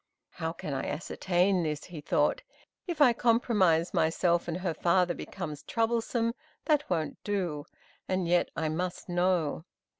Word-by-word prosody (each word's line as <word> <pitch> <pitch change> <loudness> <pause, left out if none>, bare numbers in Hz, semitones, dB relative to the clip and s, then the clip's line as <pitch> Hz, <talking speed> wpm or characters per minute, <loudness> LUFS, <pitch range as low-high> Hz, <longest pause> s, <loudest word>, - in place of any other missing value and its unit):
"How 160 -2 -3
can 150 -3 -6
I 135 - -2
ascertain 180 +3 +1
this?" 150 -2 -2
he 170 -4 -9
thought. - - +1 0.5
"If 335 -4 -3
I 250 -5 +7
compromise 210 -8 +2
myself, 170 +2 +2
and 170 0 -2
her 180 -3 -1
father 175 +2 +2
becomes 160 -6 -6
troublesome, 230 0 0 0.3
that 300 -2 +2
won't 160 -3 -2
do; 175 -8 -2 0.4
but 185 0 0
yet 175 0 +2
I 160 - -1
must 175 +4 -3
know." 175 -3 +1
180 Hz, 145 wpm, -29 LUFS, 160-205 Hz, 0.5 s, I